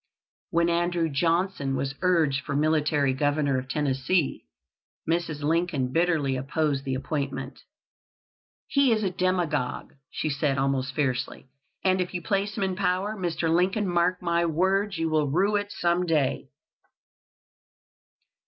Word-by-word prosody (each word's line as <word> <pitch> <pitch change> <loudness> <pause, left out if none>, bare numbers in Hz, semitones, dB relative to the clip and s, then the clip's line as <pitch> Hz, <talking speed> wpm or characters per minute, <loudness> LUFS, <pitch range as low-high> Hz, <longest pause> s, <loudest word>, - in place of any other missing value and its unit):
When 170 0 +2
Andrew 170 -1 +1
Johnson 165 -1 0
was 135 +1 -2
urged 160 -7 +2
for 140 - -3
military 150 -2 +2
Governor 145 -1 +1
of 130 0 -9
Tennessee, 140 +3 0 0.6
Mrs. 165 -3 -1
Lincoln 155 -4 0
bitterly 165 -6 +1
opposed 140 +1 -1
the 130 -1 -1
appointment. 135 -1 -4 1.1
"He 280 -3 +3
is 215 -1 +1
a 190 - 0
demagogue," 175 -7 -1 0.2
she - - -3
said, 140 -1 0
almost 135 -1 0
fiercely, 130 -2 -2 0.3
"and 185 -1 +2
if 180 0 -4
you 175 - -2
place 200 +1 -1
him 200 - 0
in 190 -1 -1
power, 195 +2 0
Mr. 175 -4 -2
Lincoln, 190 +4 +2
mark 180 +1 +1
my 170 0 +1
words, 190 +4 +1
you 165 0 0
will 155 -2 +1
rue 195 +8 +2
it 205 0 -1
some 175 0 0
day." 150 -5 0
165 Hz, 135 wpm, -26 LUFS, 140-180 Hz, 1.1 s, He